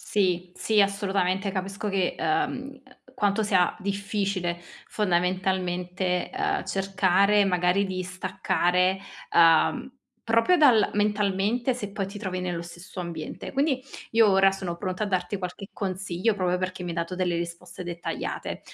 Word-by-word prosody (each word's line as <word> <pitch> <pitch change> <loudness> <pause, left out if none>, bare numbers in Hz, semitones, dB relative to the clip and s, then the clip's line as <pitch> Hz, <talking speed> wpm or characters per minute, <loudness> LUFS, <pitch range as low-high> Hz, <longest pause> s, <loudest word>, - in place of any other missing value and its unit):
Sì, 185 -5 0
sì, 215 -2 +2
assolutamente, 195 -1 +1
capisco 195 +3 -3
che 195 -2 0
uhm, 275 -9 -1 0.3
quanto 205 +1 +1
sia 185 -4 +2
difficile, 200 -3 -2 0.3
fondamentalmente, 180 -1 0
uhm, 400 0 0
cercare 195 +1 +3
magari 180 +1 +2
di 185 -1 -3
staccare, 185 0 0 0.4
uhm, 165 +9 +4 0.4
proprio 230 +11 +4
dal 250 -8 +5
mentalmente 210 +4 +1
se 205 -5 -5
poi 195 -1 -3
ti 200 +1 -8
trovi 185 -3 -3
nello 175 -2 -2
stesso 175 +2 -9
ambiente. 170 -3 -6
Quindi, 275 -2 +1 0.3
io 225 -1 +5
ora 195 0 +5
sono 185 -3 -4
pronta 185 +2 -2
a - - -3
darti 185 +1 -1
qualche 185 +2 -6
consiglio 190 +1 -1
proprio 180 -2 0
perché 185 0 -3
mi 175 - -4
hai 170 - -5
dato 170 +2 -2
delle 180 -2 0
risposte 170 +2 -5
dettagliate. 175 -1 -4
190 Hz, 140 wpm, -26 LUFS, 180-205 Hz, 0.4 s, dal